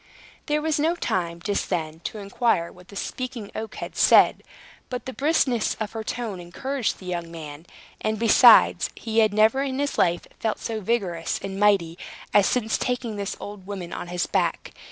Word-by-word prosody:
There 300 0 0
was 315 -1 +1
no 325 +3 +2
time, 170 - -2
just 205 -1 -1
then, 160 -1 -2
to - - -4
inquire 200 -3 0
what 180 0 -17
the 200 - -13
Speaking 245 -1 -5
Oak 220 0 -6
had - - -7
said. - - +5 0.5
But 250 -2 -5
the 260 - -5
briskness 270 -6 +1
of 215 -2 -4
her 225 -1 -5
tone 220 -4 -4
encouraged 235 +9 -3
the 185 - -13
young 175 -2 -4
man; 160 -1 -9 0.3
and, 215 0 -1
besides, 230 +1 +6
he 225 -1 -1
had 215 -2 +4
never 220 +5 +4
in 270 -1 -2
his 285 0 -1
life 175 -1 +2
felt 220 -1 -1
so 220 -1 -4
vigorous 185 -6 -1
and 195 0 -5
mighty 190 -5 +3 0.3
as 205 -1 +5
since 225 -3 0
taking 245 -3 -2
this 200 -1 -4
old 205 -2 -9
woman 190 -4 -6
on - - -5
his 175 0 -1
back. - - -1
210 Hz, 185 wpm, -24 LUFS, 180-245 Hz, 0.5 s, besides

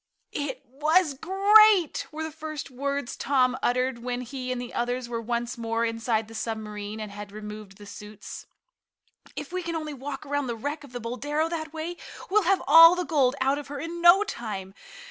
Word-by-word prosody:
"It 285 -1 -4
was 305 +5 +2
great!" 390 +3 +5
were 315 +1 -5
the 315 - -4
first 310 -2 -7
words 280 0 -3
Tom 255 -2 +2
uttered 255 0 0
when 245 +1 -3
he 255 +1 -5
and 250 - -2
the 245 -1 -7
others 245 +1 -2
were 230 -1 -3
once 235 +1 -3
more 230 0 0
inside 225 -1 -1
the 225 - -12
submarine 215 -2 -5
and 215 -1 -6
had 205 0 -8
removed 210 -2 -9
the 205 - -12
suits. 210 +1 -10 0.9
"If 295 +3 -7
we 370 - -1
can 335 -1 -4
only 310 -2 -4
walk 275 +2 -7
around 285 -1 -1
the 235 - -2
wreck 290 +6 -4
of 280 - -13
the 245 - -4
Boldero 290 +7 -2
that 320 -2 -4
way, 325 +2 -5 0.3
we'll 425 +2 +5
have 390 - +3
all 330 +4 +9
the 360 0 -2
gold 275 -5 +2
out 270 +2 +2
of 290 - -9
her 285 0 -6
in 335 +3 -5
no 345 +4 +7
time. 210 - -6
265 Hz, 195 wpm, -26 LUFS, 230-315 Hz, 0.9 s, all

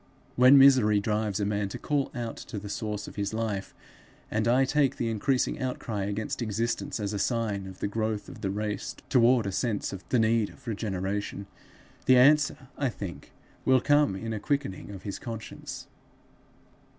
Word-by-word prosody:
When 130 +3 +8
misery 130 -7 +6
drives 105 -1 -1
a 100 - 0
man 100 -1 -1
to - - -6
call 145 -2 -1
out 120 -2 -4
to 110 - -7
the 100 0 -6
source 105 0 -4
of - - -11
his 100 +1 -2
life, 105 -4 -2 0.6
and 110 +1 0
I 130 +3 +4
take 140 0 +2
the 115 -1 -1
increasing 125 +4 0
outcry 115 -5 -3
against 105 +4 -3
existence 115 +1 -2
as 105 0 -2
a 100 - -2
sign 105 -4 -1
of 95 -1 -11
the - - 0
growth 110 0 -2
of - - -11
the 95 - -1
race 105 +1 -3
toward 120 -2 +4
a 100 - -1
sense 105 +1 -1
of 95 - -7
the 125 - +3
need 110 -1 +2
of - - -17
regeneration 100 -2 -3 0.6
the 130 - +7
answer, 135 0 +4
I 140 -2 +1
think, 100 -6 -8 0.3
will 130 0 +5
come 145 -5 +3
in 115 +3 -4
a 110 - -3
quickening 140 -8 -2
of 95 -2 -9
his 100 -2 -5
conscience. 115 -5 -7
110 Hz, 180 wpm, -28 LUFS, 100-125 Hz, 0.6 s, When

